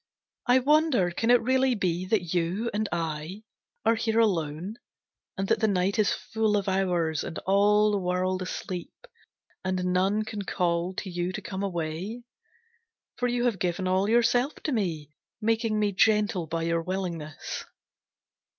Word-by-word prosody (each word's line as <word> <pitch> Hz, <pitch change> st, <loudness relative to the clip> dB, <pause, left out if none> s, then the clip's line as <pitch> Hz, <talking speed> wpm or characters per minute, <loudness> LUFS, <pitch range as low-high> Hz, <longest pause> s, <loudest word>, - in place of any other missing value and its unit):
I 245 Hz, +1 st, +6 dB
wonder 275 Hz, -, +3 dB
can 225 Hz, +7 st, -1 dB
it 245 Hz, -1 st, +5 dB
really 260 Hz, +1 st, +3 dB
be 185 Hz, -2 st, -1 dB
that 185 Hz, -5 st, 0 dB
you 180 Hz, +7 st, 0 dB
And 215 Hz, 0 st, -1 dB
I 165 Hz, +4 st, -3 dB, 0.4 s
are 225 Hz, -, +5 dB
here 225 Hz, 0 st, -1 dB
alone, 180 Hz, -1 st, 0 dB, 0.6 s
and 195 Hz, 0 st, -1 dB
that -, -, +2 dB
the 220 Hz, -, +3 dB
night 195 Hz, +1 st, +1 dB
Is 210 Hz, -, +3 dB
full 220 Hz, -1 st, 0 dB
of 200 Hz, -, -2 dB
hours, 175 Hz, -5 st, +1 dB
and -, -, -6 dB
all 210 Hz, +2 st, +4 dB
the 205 Hz, -, +1 dB
world 185 Hz, 0 st, 0 dB
asleep, 185 Hz, -, -6 dB, 0.6 s
And 185 Hz, -1 st, -1 dB
none 195 Hz, +4 st, +2 dB
can 210 Hz, -1 st, -5 dB
call 180 Hz, -1 st, -1 dB
to -, -, -4 dB
you 175 Hz, +1 st, -2 dB
to -, -, -4 dB
come 190 Hz, -1 st, -5 dB
away; 185 Hz, +5 st, -3 dB, 0.9 s
For 245 Hz, -, +1 dB
you 245 Hz, 0 st, 0 dB
have 225 Hz, -6 st, +1 dB
given 185 Hz, +1 st, -1 dB
all 190 Hz, +2 st, +2 dB
yourself 245 Hz, +4 st, +3 dB
to 305 Hz, -, -1 dB
me 165 Hz, -, -2 dB, 0.3 s
Making 225 Hz, 0 st, +1 dB
me 210 Hz, -1 st, +2 dB
gentle 210 Hz, -3 st, +2 dB
by 165 Hz, +1 st, -2 dB
your 165 Hz, 0 st, +1 dB
willingness. 170 Hz, -4 st, -4 dB
195 Hz, 160 wpm, -27 LUFS, 175-220 Hz, 0.9 s, I